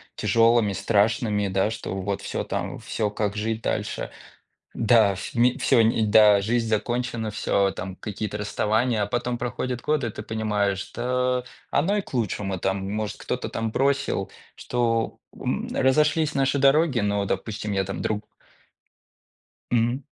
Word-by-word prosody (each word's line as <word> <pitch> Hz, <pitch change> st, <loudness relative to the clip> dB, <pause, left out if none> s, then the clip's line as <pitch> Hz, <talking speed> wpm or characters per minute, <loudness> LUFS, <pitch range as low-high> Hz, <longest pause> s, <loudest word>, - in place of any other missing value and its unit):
тяжелыми, 115 Hz, -2 st, +3 dB
страшными, 105 Hz, +1 st, +1 dB
да 95 Hz, +2 st, +1 dB
что 110 Hz, -3 st, -5 dB
вот 100 Hz, +1 st, -3 dB
всё, -, -, -3 dB
там -, -, -4 dB
всё 105 Hz, -2 st, -2 dB
как 105 Hz, 0 st, -2 dB
жить 110 Hz, +1 st, -2 dB
дальше? -, -, -2 dB, 0.6 s
Да, 110 Hz, -3 st, +4 dB
в 95 Hz, -, -7 dB
ми 120 Hz, +1 st, +4 dB
всё 115 Hz, -, +4 dB
ни 110 Hz, 0 st, +2 dB
да, 105 Hz, -1 st, +6 dB
жизнь 115 Hz, +3 st, 0 dB
закончена, 120 Hz, +1 st, -1 dB
всё 100 Hz, -1 st, +1 dB
там 95 Hz, 0 st, -6 dB
какие-то 105 Hz, +1 st, -5 dB
расставания, 110 Hz, +2 st, +1 dB
а -, -, 0 dB
потом 120 Hz, +2 st, -2 dB
проходят 125 Hz, 0 st, -3 dB
годы, 150 Hz, -5 st, 0 dB
и -, -, -2 dB
ты 105 Hz, -, -7 dB
понимаешь, 105 Hz, -3 st, -1 dB
что 125 Hz, +3 st, -1 dB, 0.3 s
оно 195 Hz, +7 st, +2 dB
и -, -, +1 dB
к -, -, -16 dB
лучшему. 105 Hz, -5 st, -1 dB
Там, 95 Hz, +1 st, -2 dB
может, 105 Hz, 0 st, -3 dB
кто-то -, -, -4 dB
там 115 Hz, 0 st, -2 dB
бросил, 135 Hz, -6 st, 0 dB, 0.2 s
что, 115 Hz, -2 st, -1 dB, 0.2 s
м, -, -, -2 dB
разошлись 150 Hz, +3 st, +2 dB
наши 135 Hz, 0 st, +1 dB
дороги, 140 Hz, 0 st, +4 dB
но, 100 Hz, -1 st, 0 dB
допустим, 105 Hz, +2 st, -3 dB
я 95 Hz, -1 st, +1 dB
там 100 Hz, +1 st, -5 dB
друг 105 Hz, 0 st, -2 dB, 1.5 s
Мгм. 120 Hz, +3 st, +1 dB
110 Hz, 150 wpm, -25 LUFS, 105-125 Hz, 1.5 s, да